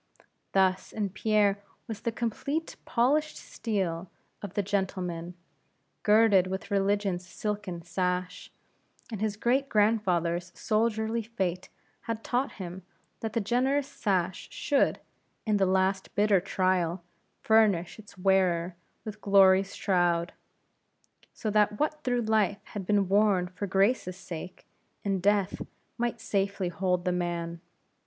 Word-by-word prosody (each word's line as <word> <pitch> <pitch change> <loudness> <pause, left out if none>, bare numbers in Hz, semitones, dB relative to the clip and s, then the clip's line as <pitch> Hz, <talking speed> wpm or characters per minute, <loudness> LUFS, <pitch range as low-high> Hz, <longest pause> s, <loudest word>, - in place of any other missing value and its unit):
Thus 190 -1 +2
in 210 -2 -2
Pierre 205 +1 +2 0.3
was 220 -2 -6
the 230 - -1
complete 260 +8 -3
polished 295 +6 +1
steel 190 -6 -3 0.3
of 200 -3 -7
the 205 - +1
gentleman, 180 -3 -2 0.7
girded 210 -3 +5
with 190 +2 -5
Religion's 200 -2 +1
silken 205 -3 -4
sash; 180 +1 -2 0.6
and 215 -3 -5
his 215 -1 -1
great 265 +5 +1
grandfather's 180 -5 +1
soldierly 220 +1 0
fate 190 -5 -3 0.4
had 225 -1 -3
taught 255 +3 -1
him 185 -1 -7 0.4
that 220 -1 -4
the - - +1
generous 265 +6 +1
sash 190 -9 -1
should, 280 -1 +1 0.5
in 215 -2 +2
the 195 -1 +3
last 190 +1 0
bitter 205 -1 +4
trial, 185 -2 0 0.4
furnish 215 -5 +3
its 205 -2 -14
wearer 180 -2 +2 0.3
with 215 -1 -7
Glory's 195 -1 +5
shroud; 175 -2 +1 1.0
so 215 - -3
that 210 0 +2
what 305 0 -1
through 245 -1 +1
life 215 -2 +2 0.2
had 195 -3 -5
been 205 -2 +3
worn 200 -2 +3
for 185 +3 -5
Grace's 195 -1 +1
sake, 180 -1 -8 0.4
in 195 -2 0
death 200 0 +1 0.4
might 240 0 -1
safely 195 -2 -1
hold 180 +1 -1
the 180 - +2
man. 170 -1 -3
195 Hz, 125 wpm, -28 LUFS, 180-215 Hz, 1.0 s, girded